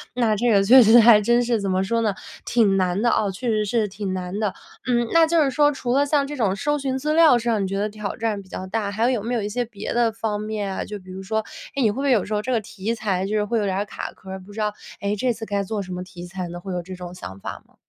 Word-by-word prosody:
那 230 -3 +2
这 235 +3 +1
个 200 -2 +4
确 250 +6 +8
实 230 +2 +7
还 225 -2 +8
真 240 +3 +3
是 235 -2 +1
怎 200 - -2
么 185 +1 +1
说 230 +4 0
呢， 215 -3 +1 0.3
挺 215 -5 +3
难 185 +1 +1
的 235 - +3
哦， 210 - +1
确 240 +6 -4
实 215 -1 +1
是 215 0 +1
挺 195 -1 -4
难 185 +1 -4
的。 210 -3 0 0.3
嗯， 240 -1 +2
那 330 -1 +6
就 330 0 +3
是 275 - 0
说 290 +3 +4
除 250 -3 -2
了 280 +1 +3
像 285 -1 +2
这 295 - -5
种 200 -5 +1
搜 295 +8 0
寻 265 -1 -2
资 300 +3 -1
料 315 -6 +6
上 230 -3 0
你 - - -1
觉 195 +1 -3
得 210 +2 -1
挑 210 -1 -5
战 220 -3 -2
比 190 - -18
较 185 - -6
大， 205 +1 -2
还 225 +5 +1
有 240 -5 -1
没 235 +3 -2
有 235 - 0
一 205 - -2
些 245 +4 -1
别 215 -2 -6
的 235 -1 +2
方 220 -1 -3
面 210 -2 -3
啊， - - -2
就 210 -1 -7
比 185 -1 -16
如 190 +1 -7
说， 220 +3 -1 0.4
诶， 275 - +2
你 225 - +4
会 - - -7
不 270 - -3
会 280 -1 +2
有 220 -6 +3
时 215 - -4
候 210 - 0
这 245 +4 -3
个 235 - +2
题 205 +2 -4
材 195 -4 -1
就 210 +2 -2
是 210 - +2
会 230 +2 0
有 210 - 0
点 190 -1 -1
儿 200 - -1
卡 - - -6
壳 190 - -15
儿， 190 - -5
不 190 +2 -14
知 220 - -7
道， 210 -1 0 0.3
诶， 200 +1 0
这 245 +4 0
次 225 0 -7
该 200 -2 -1
做 205 +1 -3
什 185 - -8
么 180 - -4
题 180 -1 -10
材 180 0 -5
呢？ 175 0 -7
会 190 +2 -7
有 175 - -2
这 185 +2 -9
种 180 -1 -8
想 95 - -9
法 - - -7
吗？ - - -30
215 Hz, 340 characters per minute, -23 LUFS, 195-240 Hz, 0.4 s, 确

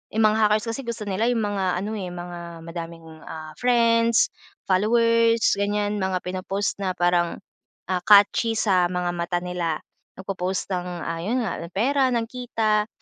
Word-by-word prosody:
'yung 220 - +3
mga 215 0 +4
hackers 210 +2 +1
kasi 270 - -5
gusto 230 -2 -4
nila 205 +3 -1
'yung 235 -3 +1
mga 195 -3 0
ano, 215 - -3
eh, 185 - -4
mga 175 -1 -8
madaming 165 0 -7 0.2
ah 155 -1 -7
friends, 230 -2 +3 0.3
followers, 230 +3 +3 0.2
ganyan, 205 0 0
mga 190 -1 -1
pinopost 190 +2 -3
na 185 -2 -2
parang, 175 -1 +1 0.5
ah, 180 - +1
catchy 210 +2 +5
sa 185 -5 +3
mga 180 0 -2
mata 175 0 -2
nila, 175 -3 -2 0.3
nagpo-post 190 0 -3
ng, 180 -1 -2 0.2
ah, 165 0 -3
'yun 235 +8 -1
nga 195 - -3
ng 170 - -8
pera, 265 +5 +2
ng 230 - +1
kita, 225 -3 -1
195 Hz, 160 wpm, -24 LUFS, 180-225 Hz, 0.5 s, catchy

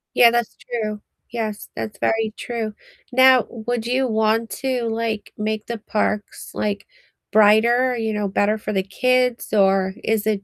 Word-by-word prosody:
Yeah, 240 - +8
that's 240 -1 -1
true, 215 -3 -4 0.3
yes, 220 -3 -4
that's 210 -2 -5
very 225 -1 0
true, 225 -3 -4 0.4
now, 260 -1 +6
would 235 0 -4
you 260 +2 +1
want 220 0 +1
to, 260 -2 -1
like, 225 -1 -3
make 215 0 -2
the 235 -1 -5
parks, 210 -1 -2
like, 205 -1 -2 0.5
brighter, 235 +4 +4
you 220 -1 -1
know, 210 -1 -1
better 205 +2 +1
for - - -4
the 190 -1 +1
kids? 250 +4 +1
Or 195 -1 +3
is 220 -1 0
it 205 -2 0
220 Hz, 155 wpm, -21 LUFS, 210-240 Hz, 0.5 s, Yeah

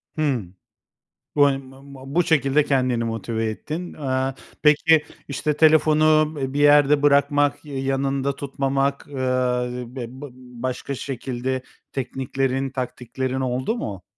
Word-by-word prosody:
Hıı, 140 - 0 0.9
bu, 145 -1 +6
hani, 135 -1 +2
ma 135 +1 -15
ma 140 0 -11
bu 175 - +4
şekilde 150 -2 +3
kendini 125 -4 +1
motive 115 0 -2
ettin. 160 +10 -5
Eee, 130 -2 -1 0.3
peki, 150 +1 +5 0.2
işte, 145 +2 -2
telefonu, 155 0 +4
eee, 135 0 -2
bir 145 - -1
yerde 145 0 +5
bırakmak, 145 0 +3
ya 140 -2 -5
yanında 135 0 -1
tutmamak, 140 0 -1
ııı, 125 -2 -1
b 125 -2 -4 0.2
bı 145 - -7
başka 130 +2 -5
şekilde 130 0 -3 0.3
tekniklerin, 135 0 -2
taktiklerin 130 0 -4
oldu 130 - -1
mu? 100 - -5
135 Hz, 125 wpm, -23 LUFS, 130-145 Hz, 0.9 s, bu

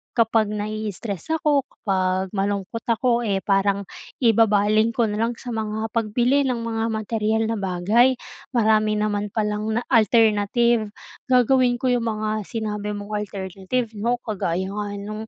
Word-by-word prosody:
kapag 225 -2 +3
naii-stress 210 -2 -4
ako, 290 -4 +1
kapag 185 -1 -1
malungkot 200 +2 -2
ako, 235 +1 +2
eh, 195 -4 -1
parang 200 0 +1 0.4
ibabaling 215 0 +3
ko 240 - +2
na 210 - -3
lang 230 +1 0
sa 245 +1 -8
mga 220 0 -3
pagbili 240 +5 +1
ng 255 - 0
mga 225 -1 -1
materyal 220 0 0
na 225 - -2
bagay. 200 +7 +3 0.4
Marami 215 -2 +3
naman 210 -1 -1
palang 215 0 -1
na 235 - +1
alternative. 225 0 +3 0.4
Gagawin 250 0 +4
ko 260 -1 +1
'yong 245 -1 +1
mga 215 -1 -2
sinabi 210 -2 -3
mong 205 +1 -7 0.2
alternative, 195 +5 -3
'no. 230 +4 0
Kagaya 190 -3 -2
nga 205 0 -3
no'ng 215 +2 -6
215 Hz, 140 wpm, -23 LUFS, 205-230 Hz, 0.4 s, Gagawin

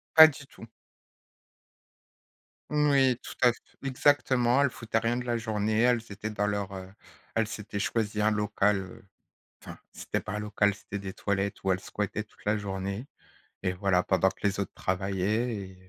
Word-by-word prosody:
Pas 160 0 +12
du 145 -1 -9
tout. 115 -4 -13 2.0
Moui, 140 -4 +3
tout - - -8
à 125 - +7
f - - -16 0.3
exactement, 130 -2 +3
elles 140 - +4
foutaient 115 -1 -2
rien 115 +2 0
de 125 - -3
la 120 -1 0
journée, 110 -1 -1
elles 120 -1 +3
étaient 105 +2 -5
dans 105 -1 -1
leur, 100 -1 -2
heu 95 -1 -7 0.5
elles 115 -1 +2
s'étaient 105 -2 -5
choisies 105 +1 -1
un 105 +1 +4
local, 105 -1 +2
heu, 95 0 -12 0.6
enfin, - - -10
c'était - - -3
pas - - -6
un 105 - -2
local 105 -1 +1
c'était 100 0 -7
des 95 -1 -6
toilettes 100 0 -2
où 95 - +2
elles 95 - +1
squattaient 105 +2 -3
toute 105 - -24
la 105 +1 +2
journée, 100 +4 -4 0.6
et 90 -1 0
voilà 90 -1 +2
pendant 95 0 +2
que 95 - -16
les 100 -1 +1
autres 100 - -2
travaillaient 100 +5 -1
et 95 -1 -9
105 Hz, 180 wpm, -28 LUFS, 100-120 Hz, 2.0 s, Pas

